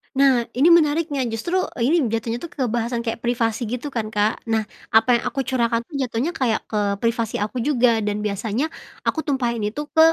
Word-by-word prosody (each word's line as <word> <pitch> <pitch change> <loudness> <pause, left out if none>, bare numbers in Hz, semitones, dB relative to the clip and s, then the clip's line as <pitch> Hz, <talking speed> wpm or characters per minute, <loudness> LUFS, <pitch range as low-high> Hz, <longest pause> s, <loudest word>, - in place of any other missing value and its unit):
Nah 265 -3 +4
ini 290 +7 +5
menariknya 300 -4 +3
justru 235 +12 -1 0.2
ini 270 +8 +2
jatuhnya 230 +1 -2
tuh 340 - -6
ke 285 -4 -4
bahasan 235 0 -1
kayak 225 -1 -3
privasi 235 -1 -1
gitu 250 +5 -4
kan, 230 -4 -2
Kak, 215 +1 0
nah 225 -1 +1 0.2
apa 230 +2 +4
yang - - -8
aku 270 - -2
curahkan 235 -2 0
tuh - - -37
jatuhnya 260 +5 -1
kayak 245 -8 0
ke 205 -2 +1
privasi 230 -1 0
aku 210 +5 -2
juga 245 -3 +3
dan 210 0 -2
biasanya 215 +8 -1 0.3
aku - - 0
tumpahin 245 -5 0
itu 215 +8 -2
ke 320 0 +6
235 Hz, 190 wpm, -22 LUFS, 225-270 Hz, 0.3 s, ke